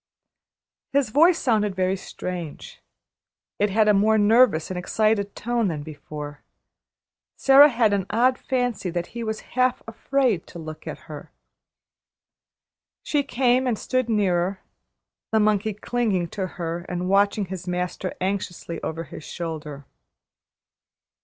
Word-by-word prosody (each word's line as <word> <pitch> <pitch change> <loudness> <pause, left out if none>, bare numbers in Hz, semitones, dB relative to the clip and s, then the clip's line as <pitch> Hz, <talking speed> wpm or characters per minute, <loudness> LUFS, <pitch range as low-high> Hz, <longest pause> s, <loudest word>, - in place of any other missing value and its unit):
His 275 -5 +2
voice 330 +6 +5
sounded 210 -8 +1
very 185 0 +1
strange; 180 - -7 0.8
it 205 +1 +2
had 215 +2 +3
a 210 - +6
more 215 +2 +4
nervous 210 -6 +4
and 185 - -3
excited 210 +1 0
tone 235 -2 0
than 155 -5 -3
before. 150 -1 -8 1.0
Sara 280 +2 +8
had 230 -5 +2
an 195 -2 -1
odd 250 +3 +2
fancy 245 -7 -1
that 175 0 -2
he 235 -1 -4
was 220 -1 -3
half 255 0 +1
afraid 230 -4 0
to - - -11
look 155 -1 -9
at - - -6
her. - - -10 1.7
She 295 - +1
came 255 -1 +1
and 235 -3 0
stood 255 +1 -1
nearer, 190 -3 +1 0.7
the 220 - +3
monkey 215 0 +1
clinging 210 -6 -1
to 190 0 -3
her 170 0 -3
and 180 0 -2
watching 200 +1 +2
his 185 -1 -7
master 180 +1 -3
anxiously 185 -3 -3
over 165 +1 -4
his 155 - -10
shoulder. 150 -5 -6
205 Hz, 135 wpm, -24 LUFS, 180-235 Hz, 1.7 s, Sara